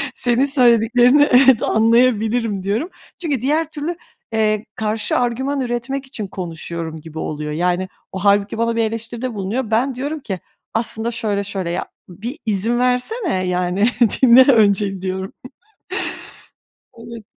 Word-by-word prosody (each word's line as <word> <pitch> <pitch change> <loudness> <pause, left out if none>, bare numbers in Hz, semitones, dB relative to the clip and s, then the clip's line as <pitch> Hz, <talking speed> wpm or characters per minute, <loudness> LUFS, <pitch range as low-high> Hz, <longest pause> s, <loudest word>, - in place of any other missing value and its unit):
senin 245 +2 +1
söylediklerini 250 +1 +4
evet, 255 -1 +6
anlayabilirim." 225 -2 +2
diyorum. 215 - -1 0.3
Çünkü 290 -8 -1
diğer 305 +4 0
türlü, 315 +2 -4 0.4
eee, 215 -1 +1
karşı 215 0 -1
argüman 265 +3 -1
üretmek 255 +2 -3
için 230 -6 -6
konuşuyorum 165 -3 -6
gibi 160 0 -9
oluyor. 150 -1 -4
Yani, 180 +3 0 0.2
o 190 - -5
hâlbuki 200 +2 +2
bana 230 0 0
bir 230 - +1
eleştiride 230 +2 -4
bulunuyor. 215 +4 -3
Ben 250 +4 +1
diyorum 290 +5 -4
ki 195 -9 -5 0.3
aslında 225 0 -1
şöyle 205 -3 -1
şöyle 195 -3 -4
ya, 175 +2 -2 0.2
bir 230 - -7
izin 220 +3 0
versene, 250 - 0
yani, 180 +2 +1 0.4
dinle 255 +1 +9
önce, 200 -4 +2
diyorum. 190 0 -4 1.6
Evet. 230 -1 -10
225 Hz, 130 wpm, -19 LUFS, 195-250 Hz, 1.6 s, dinle